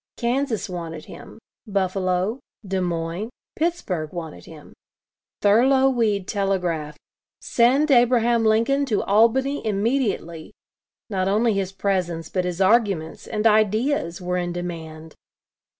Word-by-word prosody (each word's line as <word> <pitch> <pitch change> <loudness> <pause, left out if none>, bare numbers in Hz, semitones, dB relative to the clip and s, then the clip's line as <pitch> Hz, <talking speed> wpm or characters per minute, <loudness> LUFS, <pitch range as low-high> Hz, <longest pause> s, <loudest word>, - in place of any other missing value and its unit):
Kansas 245 -1 -1
wanted 165 -4 -6
him; - - -12 0.3
Buffalo, 190 +2 0 0.3
Des 190 0 -1
Moines, 170 +4 -3 0.3
Pittsburgh 205 - -2
wanted 160 - -7
him; - - -13 0.7
Thurlow 260 +6 +5
Weed 215 -6 0
telegraphed: 180 -7 -1 0.4
"Send 270 +6 +2
Abraham 240 -2 +4
Lincoln 230 +6 +2
to 215 -5 0
Albany 245 +7 +2
immediately." 205 - -1 0.6
Not 190 -1 0
only 215 +3 +2
his 195 -1 -2
presence, 180 -4 -2
but 185 -1 -1
his 180 0 -3
arguments, 195 -5 +1
and 215 -1 -3
ideas, 215 - +2
were 180 0 -2
in 175 -1 -2
demand. 160 -3 -7
200 Hz, 115 wpm, -23 LUFS, 175-235 Hz, 0.7 s, Thurlow